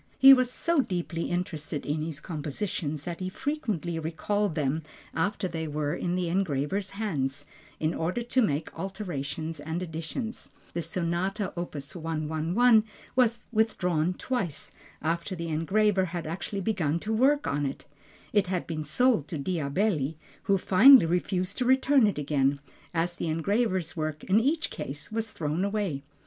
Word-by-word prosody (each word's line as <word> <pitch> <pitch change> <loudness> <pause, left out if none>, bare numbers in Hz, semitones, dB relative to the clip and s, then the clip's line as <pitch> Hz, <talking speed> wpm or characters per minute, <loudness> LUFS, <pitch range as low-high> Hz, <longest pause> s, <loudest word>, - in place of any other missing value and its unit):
He 270 0 +10
was 255 -2 +3
so 335 +5 +1
deeply 175 -7 -1
interested 160 -4 -3
in 150 +1 -1
his 155 -2 -4
compositions 150 -1 -3
that 170 0 -5
he 185 0 -2
frequently 200 - -2
recalled 170 +4 -1
them 150 +2 0 0.3
after 195 +3 0
they 160 -2 -4
were 150 0 -1
in 175 0 -1
the 180 -1 0
engraver's 185 +1 0
hands, 145 -9 -2 0.3
in 155 +1 0
order 180 +9 -1
to 255 +2 +2
make 155 -7 0
alterations 165 -5 -4
and 160 +4 -3
additions. 165 +8 -5 0.2
The 170 - -1
Sonata, 180 +4 -1
opus 165 -2 -5
111 165 +8 +2 0.3
was 235 -2 +3
withdrawn 180 -7 +1
twice, 180 - -3 0.3
after 170 +4 -1
the 170 -1 -4
engraver 190 +5 +2
had 175 -1 -4
actually 190 +5 -4
begun 170 -7 0
work 265 +7 +3
on 145 0 0
it. 135 - -6 0.5
It 205 -3 +3
had 180 -1 -1
been 160 -2 -3
sold 170 - +2
to 160 - -4
Diabelli, 160 0 0 0.3
who 195 - +4
finally 215 +4 +8
refused 180 +4 -1
to 250 - +1
return 265 -1 +5
it 205 - -1
again, 140 -1 +1 0.3
as 175 +1 0
the - - -2
engraver's 185 +2 0
work 155 -2 -3
in 195 +3 +4
each 310 +7 0
case 145 +6 -6
was 225 0 -1
thrown 155 +1 -2
away. 200 -8 -1
175 Hz, 150 wpm, -28 LUFS, 155-210 Hz, 0.5 s, He